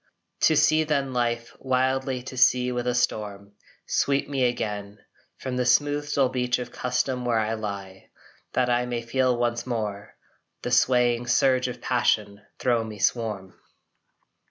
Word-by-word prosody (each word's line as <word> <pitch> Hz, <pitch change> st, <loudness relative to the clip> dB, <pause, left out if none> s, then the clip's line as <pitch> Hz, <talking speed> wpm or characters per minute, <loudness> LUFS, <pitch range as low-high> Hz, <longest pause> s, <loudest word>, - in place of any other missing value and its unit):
To 155 Hz, -, +4 dB
sea 155 Hz, +1 st, +4 dB
then, 140 Hz, -4 st, -1 dB
Life, 120 Hz, -1 st, -1 dB
wildly 130 Hz, 0 st, 0 dB
to 130 Hz, -, -8 dB
sea 125 Hz, 0 st, +4 dB
with 125 Hz, 0 st, -2 dB
a 125 Hz, -, +1 dB
storm 105 Hz, -4 st, -2 dB, 0.3 s
Sweep 140 Hz, 0 st, +1 dB
me 135 Hz, -3 st, 0 dB
again, 105 Hz, -4 st, -3 dB, 0.4 s
From 130 Hz, -1 st, -4 dB
the 125 Hz, -, 0 dB
smooth 145 Hz, +3 st, +2 dB
dull 135 Hz, -3 st, +3 dB
beach 125 Hz, -1 st, 0 dB
of 125 Hz, -1 st, -6 dB
custom 125 Hz, +1 st, -1 dB
where 120 Hz, -2 st, +1 dB
I 110 Hz, 0 st, 0 dB
lie, 100 Hz, -3 st, -6 dB, 0.4 s
That 125 Hz, -1 st, +2 dB
I 120 Hz, 0 st, +1 dB
may 120 Hz, -1 st, -3 dB
feel 125 Hz, +1 st, +1 dB
once 120 Hz, 0 st, -1 dB
more 105 Hz, -4 st, -4 dB, 0.5 s
The 125 Hz, -, -3 dB
swaying 120 Hz, -1 st, +3 dB
surge 130 Hz, +1 st, +3 dB
of 125 Hz, -1 st, -7 dB
passion 105 Hz, -5 st, 0 dB, 0.2 s
thro 120 Hz, -3 st, +1 dB
me 110 Hz, -1 st, -8 dB
swarm! 105 Hz, -3 st, -1 dB
125 Hz, 155 wpm, -25 LUFS, 115-130 Hz, 0.5 s, To